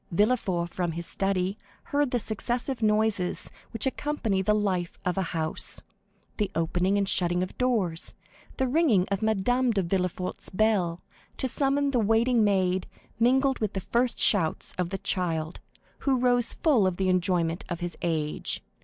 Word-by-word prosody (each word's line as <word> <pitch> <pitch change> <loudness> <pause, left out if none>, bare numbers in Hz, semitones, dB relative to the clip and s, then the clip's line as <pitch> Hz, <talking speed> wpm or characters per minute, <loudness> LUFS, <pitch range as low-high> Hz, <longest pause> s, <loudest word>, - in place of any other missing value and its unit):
Villefort, 185 -4 +1
from 175 -2 -1
his 170 +1 -4
study, 195 +1 -1 0.3
heard 290 -1 +2
the 245 - +1
successive 240 +4 -3
noises 210 -4 +1 0.2
which 225 - 0
accompany 260 -8 -1
the 210 +3 +2
life 185 -5 -1
of 180 - 0
a 195 - 0
house,—the 165 +5 -4
opening 175 +4 +1
and 200 -1 +1
shutting 175 -1 +1
of 185 - -6
doors, 210 -10 -1 0.4
the 265 - +1
ringing 255 - +3
of 200 - 0
Madame 220 +4 +1
de 205 -4 +1
Villefort's 180 0 -2
bell, 185 -4 +1 0.3
to 260 - 0
summon 280 +2 +1
the 250 - +2
waiting 225 +2 +3
maid, 190 -2 +1 0.3
mingled 265 +3 +3
with 215 -2 -2
the 195 - -2
first 235 +6 0
shouts 165 -7 +2
of 180 -1 0
the 195 - -3
child, 170 -4 -2 0.4
who 270 -2 +1
rose 245 -1 +2
full 255 - +3
of 180 -2 -2
the 190 - 0
enjoyment 180 -2 +1
of 175 -2 -3
his 175 -1 -3
age. 155 -3 -1
195 Hz, 155 wpm, -27 LUFS, 180-240 Hz, 0.4 s, ringing